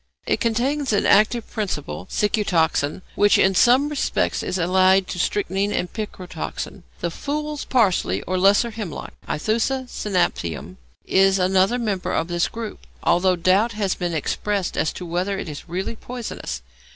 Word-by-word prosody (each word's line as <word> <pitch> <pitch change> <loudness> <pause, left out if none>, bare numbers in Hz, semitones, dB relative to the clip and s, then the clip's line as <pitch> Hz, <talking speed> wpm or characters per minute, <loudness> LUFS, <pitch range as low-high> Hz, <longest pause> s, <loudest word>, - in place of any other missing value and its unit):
It - - +1
contains 260 +4 0
an 205 - +2
active 215 +3 +4
principle, 150 - -4
cicutoxin, 180 -6 +1
which 205 0 +4
in 190 - +4
some 250 +8 +5
respects 295 -2 0
is 185 - -2
allied 185 +2 +4
to 180 - -4
strychnine 200 +1 0
and 180 - -2
picrotoxin. 185 -3 -6 0.2
The 170 - -1
fool's 300 - -4
parsley, 185 - +2
or 185 +1 -1
lesser 200 +5 +4
hemlock 210 -8 -6 0.2
(Æthusa 235 - 0
cynapium), 90 - -2 0.3
is 195 0 +4
another 190 +4 +3
member 210 -6 -2
of 165 - 0
this 175 0 +1
group, 230 -2 -7 0.2
although 185 +1 +3
doubt 190 +7 +2
has 205 -3 0
been 175 -2 -3
expressed 195 +5 -1
as 155 - +1
to 180 - -7
whether 180 +4 -1
it - - -5
is 150 -1 -8
really 190 +6 -3
poisonous. 230 - -6
195 Hz, 150 wpm, -22 LUFS, 175-220 Hz, 0.3 s, some